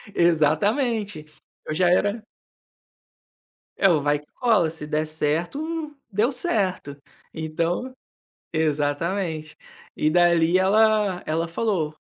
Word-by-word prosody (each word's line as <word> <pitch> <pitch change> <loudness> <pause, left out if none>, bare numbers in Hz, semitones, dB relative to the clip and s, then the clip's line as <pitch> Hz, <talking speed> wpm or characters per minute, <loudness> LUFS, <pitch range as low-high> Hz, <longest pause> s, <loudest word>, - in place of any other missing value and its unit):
Exatamente, 175 - +1 0.4
eu 155 - -3
já 175 +2 +2
era 205 +5 +1 1.5
É 195 - +4
o 155 -4 +3
vai 145 0 +1
que 150 - -22
cola 220 -10 +2
se 155 -2 -7
der 155 +1 -1
certo, 285 - -2 0.2
deu 220 +7 +1
certo, 190 - -1 0.4
então 165 +10 -2 0.6
Exatamente, 155 +2 -1 0.4
e 155 - +1
dali 175 +1 +4
ela 210 -1 +3
ela 165 +2 -1
falou: 165 -5 -1
175 Hz, 105 wpm, -23 LUFS, 155-210 Hz, 1.5 s, É